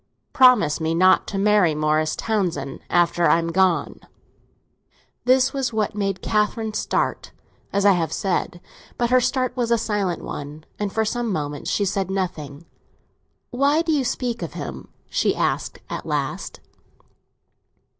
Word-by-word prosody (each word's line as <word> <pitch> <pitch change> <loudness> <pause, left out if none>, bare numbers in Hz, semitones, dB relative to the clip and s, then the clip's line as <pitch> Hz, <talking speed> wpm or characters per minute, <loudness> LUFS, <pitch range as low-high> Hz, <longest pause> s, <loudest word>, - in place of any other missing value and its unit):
Promise 250 - +5
me 160 +1 0
not 185 +2 +4
to 200 - -4
marry 200 -5 +3
Morris 155 +1 +1
Townsend 175 -11 -2
after 175 0 +3
I - - +5
am 165 0 -2
gone." 185 -1 +1 1.3
This 255 +1 +4
was 270 -3 -1
what 215 -1 0
made 195 -2 -2
Catherine 215 +1 0
start, - - -1 0.4
as 200 0 0
I 200 - +7
have 165 -4 0
said; 175 -1 -2 0.4
but 240 0 0
her 255 0 +5
start 255 0 0
was 240 -2 -1
a 235 - +3
silent 205 -5 -2
one, 145 +2 -7 0.2
and 205 -1 -2
for 220 +1 0
some 235 +1 -2
moments 145 -4 -3
she 205 - +1
said 190 -1 -1
nothing. 170 -6 -4 0.9
"Why 280 +5 +2
do 325 - -1
you 290 -3 +2
speak 240 -1 -2
of - - -5
him?" - - -7 0.2
she - - 0
asked - - -1
at - - -5
last. - - -3
200 Hz, 150 wpm, -22 LUFS, 170-240 Hz, 1.3 s, I